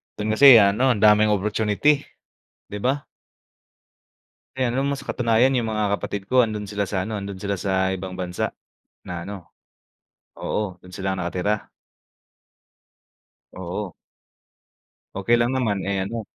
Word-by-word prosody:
do'n 105 +1 -2
kasi, 135 +3 +9
ano, 120 +5 +3
ang 105 - -3
daming 105 0 +6
opportunity, 105 +7 +1 0.7
'di 105 - -4
ba? 135 +5 0 1.5
Eh, 130 -2 +1
alam 130 +3 -1
mo, 140 - 0
sa - - -14
katunayan 120 +2 +2
'yong 120 - 0
mga 105 -2 0
kapatid 100 - -5
ko 130 -1 +5
nando'n 105 -2 -5
sila 100 0 -2
sa 95 -1 -3
ano, 110 - -3
nando'n 100 -2 -6
sila 100 0 -2
sa 95 0 0
ibang 95 0 -7
bansa, 90 -1 -3 0.5
na 90 -1 -5
ano 95 -2 -8 0.9
oo, 100 -4 -3
do'n 90 +1 -17
sila 95 0 -3
nakatira. 95 +3 -2 1.8
Oo. 95 +1 -5 1.2
Okey 110 +5 +2
lang 120 +2 +1
naman, 110 -7 -1
eh, 95 -1 -1
ano. 115 0 -5
105 Hz, 140 wpm, -23 LUFS, 95-115 Hz, 1.8 s, kasi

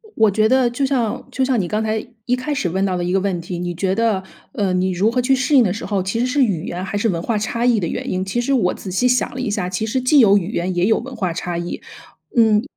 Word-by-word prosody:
我 220 -2 +4
觉 215 +2 +3
得 255 0 +3
就 250 +4 -1
像 250 -5 -1
就 265 - -1
像 255 -3 +1
你 180 - -1
刚 215 +4 -1
才 220 0 -2 0.2
一 250 - +2
开 290 +4 -3
始 200 -10 -1
问 190 +3 0
到 185 -2 0
的 175 - -2
一 180 - -1
个 195 - +2
问 190 -2 -1
题。 175 +1 -6
你 175 0 -3
觉 190 +2 0
得， 215 -3 +1 0.3
呃， 200 -3 0
你 185 +1 +1
如 195 +5 +1
何 250 +1 +1
去 265 +2 +3
适 260 +3 +1
应 255 - +7
的 185 -5 0
时 220 - -6
候， 200 -2 -1
其 190 +5 -2
实 245 - +2
是 270 +2 +2
语 185 -9 -1
言 180 +1 -4
还 195 +2 -3
是 220 +2 +1
文 170 -2 -1
化 220 +3 -1
差 230 +3 -1
异 240 -3 +3
的 170 - -2
原 - - -4
因， 185 0 -1
其 190 +5 -2
实 260 +3 0
我 210 -9 +2
仔 190 - -8
细 245 +7 +2
想 250 0 +1
了 260 - -4
一 255 - -2
下， 200 -3 -1
其 185 +4 -2
实 240 +4 -1
既 255 +4 +4
有 205 -5 +6
语 190 +1 -2
言 180 +2 -1
也 175 +1 +2
有 220 +2 +3
文 260 +3 -8
化 185 -6 -2
差 175 +1 -4
异。 170 +1 -5 0.6
嗯， 220 -1 +4
210 Hz, 325 characters per minute, -20 LUFS, 185-245 Hz, 0.6 s, 应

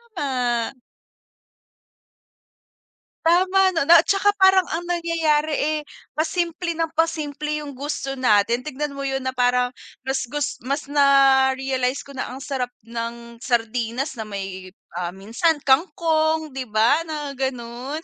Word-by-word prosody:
Tama. 250 -6 -1 2.5
Tama 370 +3 +4
no, 325 -5 0
na 340 0 +8
at - - -30
saka 405 +1 +3
parang 380 -2 +5
ang 330 +2 -3
nangyayari 330 -3 0
eh 305 +2 0 0.3
pasimple 335 +1 -2
nang 325 -1 -1
pasimple 300 -2 -1
'yung 285 - -7
gusto 275 0 -4
natin, 230 -1 +3
tignan 295 0 -3
mo 280 - -9
'yun 270 -1 -2
na 260 - -1
parang 250 0 +2 0.3
mas 265 -2 -2
gus 295 +3 -3
mas 280 +3 -4
na-realize 270 -2 +3
ko 280 - -13
na 270 - -4
ang 265 +2 -8
sarap 265 -3 -2 0.2
ng 235 0 -7
sardinas 240 +2 -2
na 220 - -4
may, 195 -2 -7 0.2
ah, 175 0 -4
minsan 230 - +1
kangkong, 315 +1 +2
di 260 -1 -5
ba 220 +7 +3
na 300 -2 -4
ganun. 265 +2 -4
275 Hz, 135 wpm, -22 LUFS, 245-315 Hz, 2.5 s, na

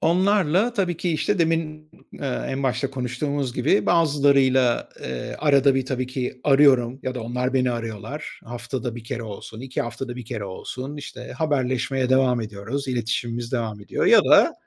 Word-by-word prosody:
Onlarla 190 +4 +3
tabii 180 -6 0
ki 175 -1 -1
işte 185 +5 0
demin, 160 -2 -1 0.3
ııı, 135 -3 -2
en 135 +1 -3
başta 135 +1 0
konuştuğumuz 135 +1 -2
gibi, 145 +10 +2
bazılarıyla, 140 -6 +3
ııı, 65 -1 -5
arada 140 -2 +4
bir 135 -1 0
tabii 130 -1 -2
ki 130 0 -4
arıyorum 135 -3 +4
ya 130 - -3
da 125 - -4
onlar 125 +3 -2
beni 125 -1 +2
arıyorlar. 115 +5 -6
Haftada 120 0 -5
1 115 - -9
kere 115 0 -4
olsun, 110 +1 -8
2 130 0 -3
haftada 120 +2 -5
1 125 - -7
kere 110 -3 -5
olsun, 130 +9 -6
işte 130 -3 -8
haberleşmeye 130 -3 0
devam 130 -2 +3
ediyoruz, 115 +6 -5
iletişimimiz 120 0 -2
devam 110 -4 -2
ediyor 100 - -1
ya - - +8
da - - +6
130 Hz, 165 wpm, -23 LUFS, 120-145 Hz, 0.3 s, ya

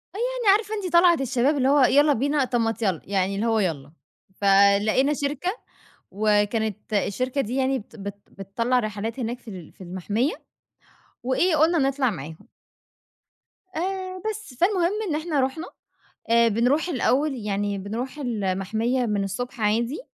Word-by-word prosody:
آه. - - -5
يعني 485 -3 +2
عارفة 435 -1 -7
أنتِ 375 -5 -4
طَلعِة 345 0 +7
الشباب 270 +3 +1
اللي 260 0 +2
هو 290 +1 +4
يالّا 290 +4 +5
بينا، 280 +2 +1
طب 245 -1 -1
ما 225 -1 +1
تيالّا. 195 -8 -2
يعني 195 0 0
اللي 205 +3 -1
هو 225 -1 +2
يالّا. 150 -8 -2 0.5
فلقينا 200 +7 +4
شركة 290 +4 -2 0.6
وكانت 210 +1 0
الشركة 250 +7 -1
دي 250 0 -3
يعني 265 0 +1
بت 215 - -13
بت 200 -1 -6
بتطلّع 230 +6 -1
رحلات 220 +2 -4
هناك 240 +1 -3
في 245 - -18
ال 180 -5 -10
في - - -33
المَحمية، 205 - -1 0.9
وإيه 310 +7 +1
قُلنا 325 +3 +3
نطلع 270 -2 +1
معاهم. 160 -4 -9 1.3
آآ 370 +2 -3
بس. 430 -9 -7
فالمهم 355 - +2 0.2
إن 300 - 0
إحنا 310 -1 -1
رُحنا. 290 +7 -2 0.6
آآ 235 0 +5
بنروح 245 - +1
الأول 285 -1 +1
يعني 205 -3 -2
بنروح 230 +9 -5
المَحمية 225 +1 -1
من 205 -2 0
الصبح 230 +5 -5
عادي 230 - 0
245 Hz, 150 wpm, -24 LUFS, 205-290 Hz, 1.3 s, طَلعِة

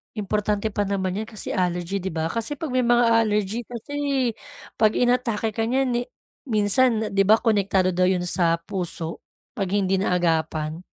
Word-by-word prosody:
Importante 210 +1 -1
pa 205 0 -1
naman 190 -1 -2
'yan 220 - -4
kasi 215 -2 -6
allergy 180 +1 -1
'di 190 - -7
ba, 160 0 -1
kasi 230 +5 -2
pag 295 0 -5
may 255 -1 +1
mga 240 0 +4
allergy 210 +1 0
kasi 245 +4 -8 0.8
pag 215 -1 +3
inatake 245 -3 +1
ka 225 +1 -2
nyan 260 +1 +1
ni 240 - 0 0.5
minsan 220 +1 +2
'di 195 0 +3
ba 215 - +7
konektado 200 -4 +2
daw 180 +1 +2
'yon 185 -1 +1
sa 170 -1 +2
puso 170 -2 -3 0.4
pag 195 - 0
hindi 195 -1 +1
naagapan. 165 -3 0
205 Hz, 165 wpm, -23 LUFS, 185-230 Hz, 0.8 s, ba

